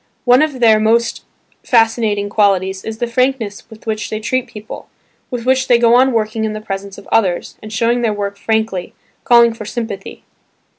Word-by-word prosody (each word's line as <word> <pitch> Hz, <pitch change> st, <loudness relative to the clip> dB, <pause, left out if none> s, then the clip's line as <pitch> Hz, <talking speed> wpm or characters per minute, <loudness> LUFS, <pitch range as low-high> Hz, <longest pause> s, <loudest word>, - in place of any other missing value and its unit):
One 250 Hz, +2 st, +5 dB
of 295 Hz, -5 st, -1 dB
their 220 Hz, -2 st, +5 dB
most 230 Hz, +2 st, +1 dB, 0.4 s
fascinating 225 Hz, -3 st, +2 dB
qualities 195 Hz, -2 st, +1 dB
is 220 Hz, 0 st, -6 dB
the 240 Hz, -, -1 dB
frankness 235 Hz, -3 st, -1 dB
with 220 Hz, -1 st, -15 dB
which 220 Hz, -1 st, -3 dB
they 215 Hz, -, -3 dB
treat 255 Hz, +3 st, -1 dB
people, 210 Hz, 0 st, -10 dB, 0.4 s
with 245 Hz, -3 st, -5 dB
which 260 Hz, 0 st, +2 dB
they 240 Hz, -, +5 dB
go 235 Hz, 0 st, +4 dB
on 260 Hz, +2 st, +5 dB
working 220 Hz, -1 st, -1 dB
in 215 Hz, -1 st, -2 dB
the 215 Hz, -, -5 dB
presence 195 Hz, -1 st, -6 dB
of -, -, -13 dB
others, 190 Hz, -6 st, 0 dB
and 215 Hz, -, -9 dB
showing 235 Hz, +2 st, +1 dB
their 230 Hz, -2 st, +1 dB
work 200 Hz, -1 st, -3 dB
frankly, 220 Hz, -3 st, -2 dB, 0.3 s
calling 235 Hz, -1 st, +5 dB
for 225 Hz, -1 st, -9 dB
sympathy. 210 Hz, -3 st, -6 dB
220 Hz, 185 wpm, -16 LUFS, 205-235 Hz, 0.4 s, One